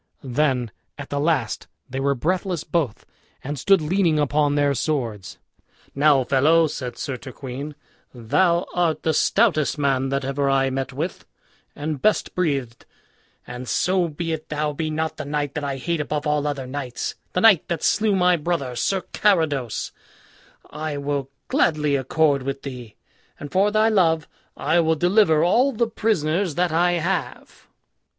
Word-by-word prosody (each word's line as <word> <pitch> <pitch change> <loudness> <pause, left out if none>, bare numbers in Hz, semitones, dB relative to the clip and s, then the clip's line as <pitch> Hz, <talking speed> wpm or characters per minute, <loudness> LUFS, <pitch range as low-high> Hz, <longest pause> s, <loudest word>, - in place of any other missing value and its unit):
Then 130 -3 0 0.3
at - - -9
the 145 - -1
last 145 -7 0 0.2
they 135 0 -5
were 140 +1 +1
breathless 180 +4 -1
both, 150 -11 -2 0.4
and 145 +1 -4
stood 195 +4 +4
leaning 170 -1 +2
upon 145 0 +1
their 145 -1 +2
swords. 120 - -3 0.6
"Now, 140 -1 +4
fellow," 150 +6 +4
said 130 -5 -5
Sir 135 -2 -4
Turquine, 135 +3 -7 0.4
"thou 170 +9 +1
art 170 -3 0
the 160 - +1
stoutest 165 -4 +2
man 135 -2 +1
that 140 0 -1
ever 140 +1 0
I 135 -1 +2
met 135 0 -3
with, 155 +7 -5 0.5
and 145 -2 -4
best 215 - +1
breathed; 140 -9 -2 0.6
and 125 0 -7
so 185 -1 +1
be 165 +1 -4
it 155 -1 -6
thou 150 0 -1
be 155 +2 -3
not 160 +1 -2
the 150 - -4
knight 145 -1 -2
that 150 - -4
I 140 -1 -2
hate 165 +4 -2
above 150 0 -3
all 150 -1 +1
other 140 -3 -3
knights, 130 -1 -4 0.2
the 180 - +1
knight 200 -7 +5
that 170 -3 -3
slew 215 -1 +2
my 180 -1 +3
brother, 150 -6 -2
Sir 190 +8 0
Carados, 155 - +1 0.8
I 150 -1 -4
will 140 -1 -2 0.2
gladly 150 -3 +2
accord 140 +1 +2
with 135 +1 -4
thee; 125 -5 -8 0.4
and 145 - -8
for 195 +2 +3
thy 215 +1 +3
love 165 -7 +2 0.3
I 160 +4 +2
will 160 -1 +2
deliver 175 -1 +3
all 245 +10 +3
the 235 -1 +1
prisoners 195 -6 0
that 180 -1 +1
I 175 +2 +2
have." 175 -1 -3
150 Hz, 160 wpm, -23 LUFS, 135-170 Hz, 0.8 s, knight